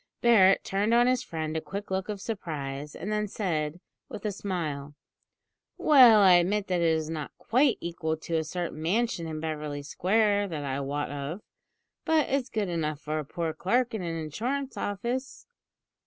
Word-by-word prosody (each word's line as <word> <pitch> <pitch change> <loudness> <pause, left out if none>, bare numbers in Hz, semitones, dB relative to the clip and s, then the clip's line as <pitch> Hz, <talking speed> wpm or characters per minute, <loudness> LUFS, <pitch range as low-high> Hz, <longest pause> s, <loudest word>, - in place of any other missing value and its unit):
Barret 200 -5 +5
turned 205 +4 +1
on 240 0 +5
his 255 0 +2
friend 160 -1 -4
a 160 - -1
quick 200 +3 -7
look 190 +1 -2
of 205 -2 -3
surprise, 150 -9 -5
and 210 - -5
then 210 0 0
said, 165 -6 -2 0.3
with 210 - -8
a 210 - 0
smile: 155 -8 -4 0.8
"Well, 250 -8 +7
I 185 -3 +8
admit 195 +4 +1
that 180 -2 +1
it 165 -1 +3
is 160 -1 -2
not 155 -2 -4
quite 255 +3 +2
equal 165 -2 -2
to 165 +1 -4
a 160 - 0
certain 165 -1 -4
mansion 185 0 0
in 155 -1 -4
Beverly 150 -2 -4
Square 205 +6 +1
that 155 -5 -4
I 135 -1 -2
wot 140 +1 -3
of, 145 +7 -5 0.6
but 320 -2 +2
it's 270 -1 0
good 215 -3 -1
enough 155 -4 -2
for 155 0 -3
a - - -3
poor 165 +2 -3
clerk 240 +9 0
in 220 - -3
an 170 -2 -3
insurance 245 - -3
office." 240 +7 -3
180 Hz, 180 wpm, -28 LUFS, 155-215 Hz, 0.8 s, I